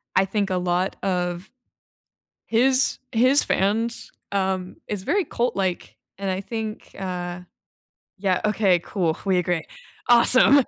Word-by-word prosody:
I 190 - +5
think 200 +1 -1
a 185 - 0
lot 180 +1 0
of 180 0 -1 1.0
his 255 +3 +3
his 255 +5 +4
fans, 225 +4 0 0.2
um 190 -2 -1
is 205 -3 -4
very 370 - +1
cult 240 0 -1
like 190 -3 -2 0.2
and 195 0 -3
I 185 +1 -2
think, 220 +1 -6
uh 180 -2 -4 0.8
Yeah, 190 -2 +1
okay, 205 -4 +3
cool, 170 -3 -1
we 190 -2 +2
agree, 175 -2 0 0.4
awesome. 255 +3 +6
195 Hz, 130 wpm, -24 LUFS, 180-225 Hz, 1.0 s, awesome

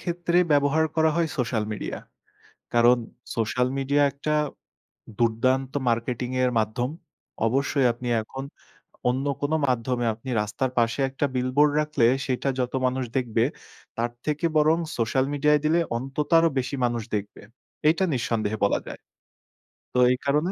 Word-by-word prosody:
ক্ষেত্রে 175 0 0
ব্যবহার 145 +2 +3
করা 160 0 +4
হয় 165 -2 +1
সোশ্যাল 115 -3 0
মিডিয়া। - - -5 0.8
কারণ 120 +1 +5 0.4
সোশ্যাল 125 +2 +1
মিডিয়া, 140 +2 +1
একটা 150 +2 -3 0.9
দুর্দান্ত 130 +3 +1 0.2
মার্কেটিং 120 +1 -1
এর 125 - +2
মাধ্যম। 115 +4 -1 0.6
অবশ্যই 135 +2 +1
আপনি 120 +1 -7
এখন 130 +5 -7 0.7
অন্য 130 +3 -1 0.2
কোন 145 +2 -1 0.2
মাধ্যমে 125 0 0
আপনি 115 +4 -10
রাস্তার 125 +5 -2
পাশে 115 +3 +1
একটা 135 +2 -1
বিলবোর্ড 130 +4 +3
রাখলে, 150 -6 +2 0.2
সেইটা 130 +1 -1
যত 125 0 -1
মানুষ 130 +1 0
দেখবে, 115 -3 +1 0.5
তার 120 +1 -1
থেকে 150 +2 -1
বরং 155 +2 +4 0.2
সোশ্যাল 130 +3 +1
মিডিয়ায় 150 +1 +3
দিলে, 165 +3 +3 0.2
অন্তত 135 +4 -4
আরও 165 0 +4
বেশি 130 +2 -3
মানুষ 120 -1 -1
দেখবে। 105 0 -5 0.5
এইটা 170 +4 +2
নিঃসন্দেহে 110 -3 -1
বলা - - +1
যায়। - - -8 0.9
তো 125 - +1
এই 125 - +1
কারণে 150 +6 +1
130 Hz, 140 wpm, -25 LUFS, 120-145 Hz, 0.9 s, কারণ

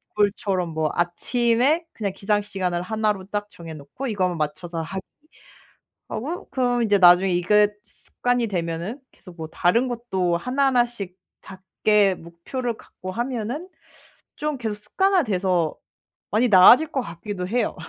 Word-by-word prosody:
골 205 -1 +3
처럼 185 -4 -1
뭐 155 -2 -1
아침에 240 - +1
그냥 205 -4 -2
기상 205 +1 +1
시간을 185 -4 -2
1 215 +2 0
로 190 -2 -10
딱 205 0 -3
정해 165 -4 -10
놓고 155 - -7
이거만 185 -6 0
맞춰서 165 +3 -3
하기 190 +4 -5 1.1
하고 315 +10 -5
그러면 245 -2 +1
이제 205 -2 +3
나중에 180 +1 +6
이게 205 +4 +4 0.2
습관이 245 -1 -2
되면은 175 - -3
계속 180 -2 -15
뭐 160 - -5
다른 180 +10 +2
것도 190 -8 -1
하나하나씩 240 -5 0 0.2
작게 195 +1 +1
목표를 175 +10 -5
갖고 185 0 -9
하면은 245 - -3 0.7
좀 300 -1 -2
계속 220 -4 -3
습관화돼서 205 - +1 0.5
많이 225 +4 +3
나아질 235 +11 +7
것 265 - 0
같기도 180 -1 -6
해요. 230 +3 0
205 Hz, 290 characters per minute, -23 LUFS, 180-240 Hz, 1.1 s, 나아질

